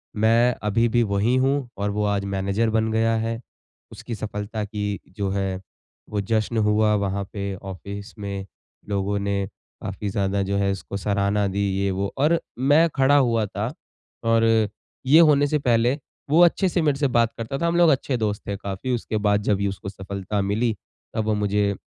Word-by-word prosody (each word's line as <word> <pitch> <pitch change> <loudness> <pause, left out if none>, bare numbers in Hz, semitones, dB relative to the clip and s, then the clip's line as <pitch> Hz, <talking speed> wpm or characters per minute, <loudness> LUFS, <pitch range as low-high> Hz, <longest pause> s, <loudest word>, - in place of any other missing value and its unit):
मैं 115 +3 +4
अभी 115 +3 +2
भी 120 +1 +3
वही 105 +4 +1
हूँ 135 -2 0
और 100 0 -1
वो 105 +1 -1
आज 100 -1 0
मैनेज़र 100 +4 0
बन 110 0 +1
गया 115 0 +2
है। 115 +1 -2 0.5
उसकी 115 - -7
सफलता 105 +1 -4
की 105 -1 -3 0.2
जो 100 -1 -1
है 95 -1 -2 0.5
वो 105 -1 -1
जश्न 110 +2 0
हुआ 105 0 +3
वहाँ 100 0 -1
पे 100 -2 -3
ऑफ़िस 100 +2 -8
में। 100 -1 -4 0.4
लोगों 100 0 0
ने 100 -1 -1 0.4
काफ़ी 100 +2 -4
ज़्यादा 100 -1 0
जो 100 +1 -1
है 100 0 +1
उसको 95 0 -5
सराहना 100 +1 +1
दी 100 +1 -1
ये 100 0 +1
वो 95 +1 -2
और 155 +4 +3 0.2
मैं 145 +5 +5
खड़ा 135 +2 +4
हुआ 115 -5 +2
था। - - -4 0.5
और 115 0 +3 0.6
ये 145 +5 +7
होने 145 -3 +5
से 150 +1 +1
पहले 120 0 +2 0.3
वो 160 +4 +5
अच्छे 185 +2 +2
से 175 -1 0
मेरे 145 -3 +2
से 140 - +3
बात 120 -2 +2
करता 115 +4 -4
था। 170 - 0
हम 170 - 0
लोग 175 -1 +6
अच्छे 135 -2 +1
दोस्त 105 -2 -1
थे 100 - -2
काफ़ी, 100 +6 -4
उसके 110 -1 -3
बाद 105 0 +2
जब 100 -1 +1
उसको 95 0 -5
सफलता 100 +1 -4
मिली 110 +3 0 0.4
तब 110 - +1
वो 110 - +1
मुझे, 105 0 +1
105 Hz, 185 wpm, -23 LUFS, 100-120 Hz, 0.6 s, ये